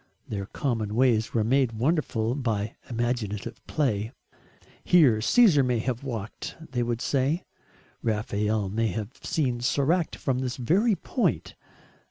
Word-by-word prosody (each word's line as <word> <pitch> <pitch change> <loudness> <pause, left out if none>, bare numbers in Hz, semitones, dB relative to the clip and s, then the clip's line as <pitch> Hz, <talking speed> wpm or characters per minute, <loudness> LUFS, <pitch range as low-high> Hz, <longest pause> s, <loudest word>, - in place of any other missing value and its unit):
Their 100 -2 -4
common 110 -5 -2
ways 115 -2 +3
were 110 - +3
made 125 +1 +2
wonderful 120 -3 0
by 115 -6 -2
imaginative 115 -2 -2
play. 110 -7 0 0.7
"Here 135 -12 +5
Caesar 185 - +5
may 125 -1 +1
have 120 +2 -2
walked," 115 -6 -5 0.2
they 120 -2 0
would 120 0 -1
say. 140 +5 0 0.6
"Raphael 105 -1 0
may 115 +3 0
have 110 0 -4
seen 130 -6 -1
Soracte 145 +7 +1
from 130 -2 -1
this 125 -1 -3
very 195 - +2
point." 240 +8 -1
120 Hz, 130 wpm, -26 LUFS, 110-140 Hz, 0.7 s, Here